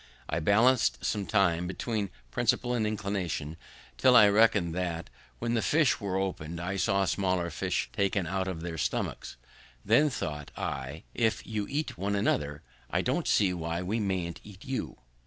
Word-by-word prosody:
I 85 - -1
balanc'd 115 +8 +4
some 105 -3 -1
time 90 -4 +2
between 105 +1 -2 0.2
principle 125 - +1
and 110 -3 +1
inclination, 100 -7 -3 0.4
till 130 -1 +5
I 105 -4 +9
recollected 100 -5 +4
that, 85 -2 -3 0.3
when 120 0 -2
the 115 - +2
fish 155 +1 +3
were 95 -2 -1
opened, 85 -4 -3
I 90 +3 -3
saw 100 0 +2
smaller 90 -3 0
fish - - -1
taken 100 -2 +1
out 95 +2 -1
of 90 -4 -4
their 85 -1 -5
stomachs; - - -2 0.5
then 120 +9 +5
thought 75 - -4
I, 70 +3 -4
"If 115 -2 0
you 105 -2 -3
eat 150 - -3
one 100 +2 0
another, 75 -7 0 0.3
I - - 0
don't - - 0
see 95 -3 +3
why 85 0 -3
we 105 +5 -1
mayn't 95 -5 -2
eat 100 -2 -13
you." 130 -1 -4
95 Hz, 165 wpm, -29 LUFS, 85-110 Hz, 0.5 s, I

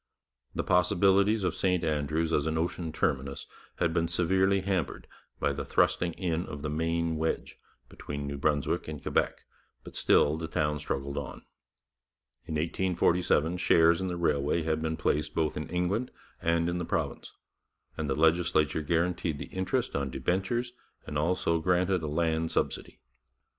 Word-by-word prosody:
The - - -1
possibilities 95 +4 +3
of 90 -2 +1
St 90 -2 +1
Andrews 80 +1 0
as 75 +1 +2
an 80 0 0
ocean 85 0 -2
terminus 70 -3 -1 0.3
had 80 - 0
been 85 -1 +1
severely 95 +3 +2
hampered 95 -3 -2 0.3
by - - +1
the - - -4
thrusting 85 -1 +1
in 85 -1 -2
of 75 0 -7
the 75 - -2
Maine 80 +1 0
wedge 80 +1 -2 0.3
between 70 0 -6
New 70 0 -4
Brunswick 75 -1 0
and 75 -2 -5
Quebec, - - -1 0.4
but - - -11
still 75 +2 +3
the 80 - -4
town 75 -2 0
struggled 70 +1 -3
on. 70 - -8 1.0
In 80 - -4
1847 85 0 +1
shares 85 0 +4
in 95 - -1
the 90 -1 -3
railway 80 -1 +1
had 80 0 0
been 80 0 -2
placed 75 +1 0
both 80 -2 0
in 75 - -5
England 90 +8 -1 0.3
and 85 0 +1
in 85 0 -1
the - - -2
province, - - -3 0.6
and 75 -2 -3
the 65 - +1
legislature 80 -1 +2
guaranteed 85 0 0
the - - -8
interest 95 0 -1
on 70 -1 -1
debentures 110 - -1 0.3
and - - -6
also 85 +2 +1
granted 90 +2 +2
a 80 - -3
land 80 +1 0
subsidy. - - -2
80 Hz, 160 wpm, -29 LUFS, 75-90 Hz, 1.0 s, shares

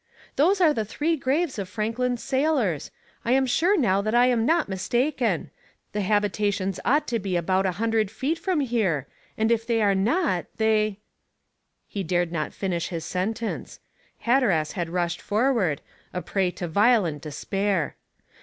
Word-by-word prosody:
"Those 370 +8 +3
are 325 -5 +5
the 220 - -1
three 300 +10 -1
graves 275 -1 0
of 190 -2 -4
Franklin's 230 +4 -2
sailors. 265 - 0 0.3
I 235 - +2
am 265 0 +3
sure 350 +10 +2
now 200 -8 +2
that 215 +3 -1
I 245 +1 +6
am 240 -2 +2
not 330 +1 +3
mistaken; 240 - 0 0.4
the 210 - -2
habitations 205 -1 0
ought 290 +5 +2
to 235 -1 0
be 190 -2 -2
about 185 +3 +1
a 185 - -1
hundred 225 0 0
feet 275 +10 -2
from 365 -6 0
here, 210 - 0 0.3
and 220 +1 +2
if 230 -1 +1
they 230 -2 +2
are 205 -2 +3
not, 195 - +1
they 215 -2 +2 0.5
" - - -51 0.3
He 200 - -4
dared 175 -1 0
not 155 -3 -2
finish 175 -4 -2
his 165 -3 -5
sentence; 215 +6 -3 0.4
Hatteras 225 - +2
had 175 -3 -3
rushed 175 0 -1
forward, 215 - +1 0.3
a 180 - -2
prey 190 -2 0
to 180 0 -5
violent 200 - +3
despair. 185 +3 -1
215 Hz, 165 wpm, -25 LUFS, 185-250 Hz, 0.5 s, I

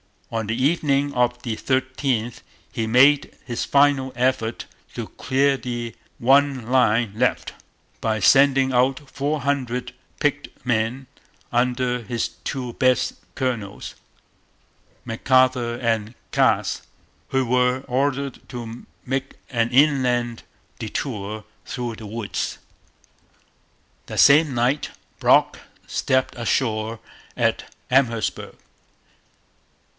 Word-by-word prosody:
On 115 -2 -2
the 110 - -1
evening 140 -1 +1
of 125 0 0
the 115 -2 -2
13th 130 -3 -1 0.3
he 110 - -2
made 135 +5 +4
his 120 -2 -3
final 140 -2 +3
effort 125 -2 0 0.3
to - - -4
clear 135 +1 +1
the 120 -2 -5 0.2
one 135 -1 +3
line 120 -4 +3
left, - - 0 0.5
by 110 -1 0
sending 135 +4 +5
out 130 +3 +1
four 145 +2 -2
hundred 125 -3 -2 0.3
picked 145 0 0 0.2
men 120 +2 0 0.5
under 125 0 +1
his 115 +1 -2 0.2
two 125 -3 -3
best 130 0 +2 0.2
colonels, 120 -7 -3 1.1
McArthur 125 0 +2
and 115 0 0 0.2
Cass, - - +2 0.5
who 135 -1 0
were 125 +1 +2
ordered 135 +1 -1
to 120 -1 -8 0.2
make 135 +1 -2 0.2
an 115 -2 +1
inland 125 -4 +2 0.4
detour 110 -2 -4 0.2
through 120 -3 -4
the 110 - -9
woods. 110 0 -3 1.5
That - - -4
same 145 -1 +6
night 125 +5 +1 0.3
Brock - - +4 0.3
stepped 130 -1 0
ashore 115 -2 -1 0.4
at - - 0 0.2
Amherstburg. 120 -4 +1
125 Hz, 100 wpm, -23 LUFS, 115-135 Hz, 1.5 s, same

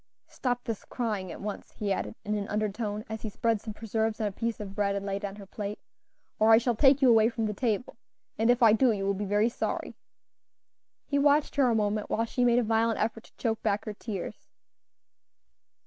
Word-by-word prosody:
Stop 245 -1 -2
this 225 -3 -4
crying 210 -7 -3
at - - -8
once," 205 0 -6
he 205 -2 -1
added, 220 - -4
in 210 - -1
an 205 -1 -3
undertone, 210 0 -2
as 220 0 -6
he 220 - -4
spread 225 +1 0
some 220 - -6
preserves 220 0 -1
on 220 - 0
a 205 - -1
piece 230 +3 -3
of 200 -2 -6
bread 200 -1 0
and 200 0 -3
laid 200 +1 -3
it - - 0
on 195 - -9
her 205 -1 -10
plate, 205 +1 -5 0.6
"or 220 +1 +5
I 220 - +9
shall 240 +1 +1
take 270 +3 +5
you 260 - +7
away 225 0 +5
from 230 -2 -2
the 210 - -1
table, 230 0 -2 0.4
and 225 +2 +1
if 245 0 +4
I 220 -2 +7
do, 245 +2 +4
you 195 -2 -2
will 200 - +2
be 200 +1 -3
very 205 +3 +2
sorry." 235 - -3 1.1
He 285 - 0
watched 290 +1 +3
her 270 -3 +4
a 230 - +2
moment 210 -1 0
while 230 - +1
she 245 +2 -1
made 240 -1 +4
a 245 - +3
violent 225 0 +1
effort 225 0 -2
to - - -22
choke 225 -2 -1
back 210 -1 0
her 215 - -4
tears. 205 -3 -6
220 Hz, 225 wpm, -28 LUFS, 205-230 Hz, 1.1 s, I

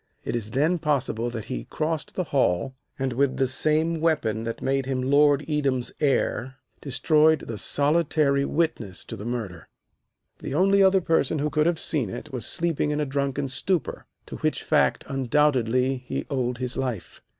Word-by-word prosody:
It - - -2
is 110 -3 -3
then 155 +9 +1
possible 135 -6 0
that 115 -2 -6
he 130 - -5
crossed 155 -1 -3
the 185 - 0
hall, 130 - 0 0.2
and 135 -2 -2
with 135 +2 +1
the 135 - +2
same 155 +5 +1
weapon 115 -9 0
which 115 - -4
made 135 -1 -1
him 130 -1 -1
Lord 145 +1 +3
Edam's 140 -5 -1
heir 135 -3 0 0.3
destroyed 155 +3 +3
the 115 -3 -6
solitary 145 -1 +2
witness 140 - -2
to - - -7
the 105 - -8
murder. 110 -8 -5 0.7
The 135 - -5
only 195 +4 +4
other 190 0 +5
person 165 -1 +1
who 150 +1 -1
could 155 +2 +2
have 170 -1 +1
seen 140 - -1
it 150 +9 -8
was 125 -4 -2
sleeping 165 -3 0
in 150 0 -1
a 150 - 0
drunken 140 0 -2
stupor, 165 +5 -2 0.2
to - - -8
which - - -1
fact - - +2
undoubtedly 130 -2 +1
he 125 0 -5
owed 125 -3 -1
his 125 0 -3
life. 125 -8 -4
140 Hz, 170 wpm, -25 LUFS, 125-155 Hz, 0.7 s, other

